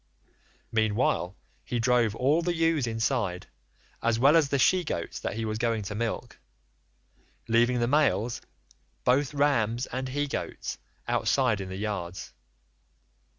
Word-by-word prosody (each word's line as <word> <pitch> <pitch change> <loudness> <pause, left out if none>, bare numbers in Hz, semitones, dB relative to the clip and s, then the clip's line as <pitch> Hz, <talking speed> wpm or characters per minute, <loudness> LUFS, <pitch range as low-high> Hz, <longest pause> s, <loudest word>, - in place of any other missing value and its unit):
Meanwhile 110 -4 +1 0.3
he 120 - -2
drove 120 -2 +2
all 145 +7 +2
the 175 0 -1
ewes 165 -5 +2
inside, 110 -5 -1 0.6
as 115 0 +2
well 140 +6 +5
as 155 -4 +4
the 140 - +1
she 180 +8 +4
goats 85 - -4
that - - -4
he 115 0 -2
was 110 0 -3
going 115 -2 0
to 100 +1 -5
milk, 115 +2 -4 1.1
leaving 120 +2 +3
the 120 - +1
males, 125 -5 +2 0.6
both 135 +3 +2
rams 125 -4 +2
and 130 +1 -4
he 145 +2 -1
goats, - - -4 0.3
outside 125 -7 +1
in 95 - -6
the 95 - -5
yards. 95 -4 -4
120 Hz, 140 wpm, -28 LUFS, 110-140 Hz, 1.1 s, well